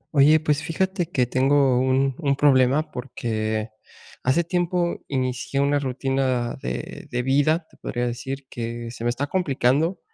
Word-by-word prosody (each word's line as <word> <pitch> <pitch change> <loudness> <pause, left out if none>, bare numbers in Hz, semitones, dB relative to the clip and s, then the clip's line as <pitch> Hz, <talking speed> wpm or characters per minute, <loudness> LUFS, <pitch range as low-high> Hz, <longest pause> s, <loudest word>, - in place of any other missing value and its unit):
Oye, 150 +3 +6
pues, 150 -1 0
fíjate 185 +2 -1
que 130 -7 +1
tengo 135 +1 +3
un 130 +1 +2
un 140 -4 +1
problema, 135 +1 +3
porque 110 -3 -3 0.5
hace 130 +7 +2
tiempo 175 0 -1
inicié 130 0 -2
una 140 +1 +2
rutina 130 -2 -1
de - - -5
de 125 - -1
vida, 145 +5 +2
te - - -24
podría 120 0 -3
decir 130 +3 -4
que 115 -1 -5
se 115 - -8
me 120 - +1
está 125 +4 -1
complicando, 150 0 +1
135 Hz, 150 wpm, -23 LUFS, 125-150 Hz, 0.5 s, Oye